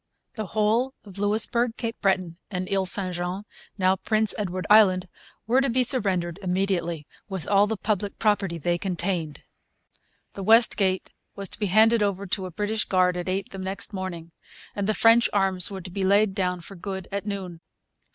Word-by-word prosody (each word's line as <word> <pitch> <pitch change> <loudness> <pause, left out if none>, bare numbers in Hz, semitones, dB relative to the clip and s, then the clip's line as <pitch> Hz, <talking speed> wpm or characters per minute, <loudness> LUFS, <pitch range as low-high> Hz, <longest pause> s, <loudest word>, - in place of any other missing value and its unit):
The 215 -3 -5
whole 230 +5 +2
of 200 -2 -10
Louisbourg, 225 +3 +1
Cape 230 -1 -4
Breton, 185 -3 0
and 185 -2 -3
Isle 195 -1 +1
St 185 0 -1
Jean 175 +3 -3 0.3
(now 190 0 +3
Prince 215 +2 0
Edward 185 -3 -3
Island) 190 -4 +5 0.4
were 250 +4 +3
to 275 - +1
be 255 +2 +2
surrendered 190 -8 0
immediately, 180 -4 -1 0.2
with 190 -4 -5
all 200 0 +4
the 220 0 -2
public 205 -1 -2
property 200 -5 +1
they 175 +2 -1
contained. 175 -5 -2 0.9
The 195 - -7
West 225 +4 +5
Gate 190 -2 0 0.2
was 195 -2 -5
to - - -7
be 210 - 0
handed 220 +4 +4
over 200 -1 0
to 190 0 -2
a - - -7
British 210 +4 -1
guard 180 -1 +2
at 180 +1 -3
eight 195 +1 -2
the 195 - -7
next 195 +3 -4
morning; 175 -3 -5 0.4
and 200 -1 -2
the 215 - +1
French 230 +4 +5
arms 190 -3 +3
were 195 -2 -6
to 180 0 -9
be 195 +2 -3
laid 200 +1 +3
down 180 -2 -1
for 195 - -10
good 190 +1 -6
at 200 +1 -4
noon. 185 -5 -5
195 Hz, 185 wpm, -25 LUFS, 185-210 Hz, 0.9 s, Island